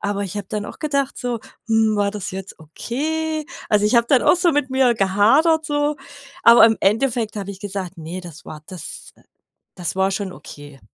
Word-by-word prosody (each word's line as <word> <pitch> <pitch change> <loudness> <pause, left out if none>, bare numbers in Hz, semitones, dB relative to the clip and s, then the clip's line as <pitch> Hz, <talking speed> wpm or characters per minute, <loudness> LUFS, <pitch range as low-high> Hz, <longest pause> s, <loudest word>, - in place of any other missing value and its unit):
Aber 200 0 -2
ich 195 +2 -6
habe 205 - -4
dann 210 -1 -3
auch - - -10
gedacht 280 -3 -1
so: 245 -2 -2 0.3
„Hm, 220 -1 +3
war 205 -1 +1
das 205 -2 -5
jetzt 190 0 -8
okay?“ 310 - -3 0.2
Also 210 -1 +3
ich 210 - +2
habe 235 0 +4
dann 265 -3 +4
auch - - +5
so 350 0 +3
mit 290 -2 0
mir 260 -2 +3
gehadert 230 - +3
so, 290 -1 0 0.5
aber 235 +1 +8
im 225 -1 +2
Endeffekt 225 +1 +1
habe 200 -1 -4
ich 195 -1 -10
gesagt: 195 -3 -6
„Ne, 165 +3 -6
das 170 -3 -11
war 155 -1 -9
das 180 -4 -9 0.6
das 170 -4 -3
war 190 0 +2
schon 195 -1 -3
okay.“ 145 -5 -12
210 Hz, 200 wpm, -21 LUFS, 190-270 Hz, 0.6 s, aber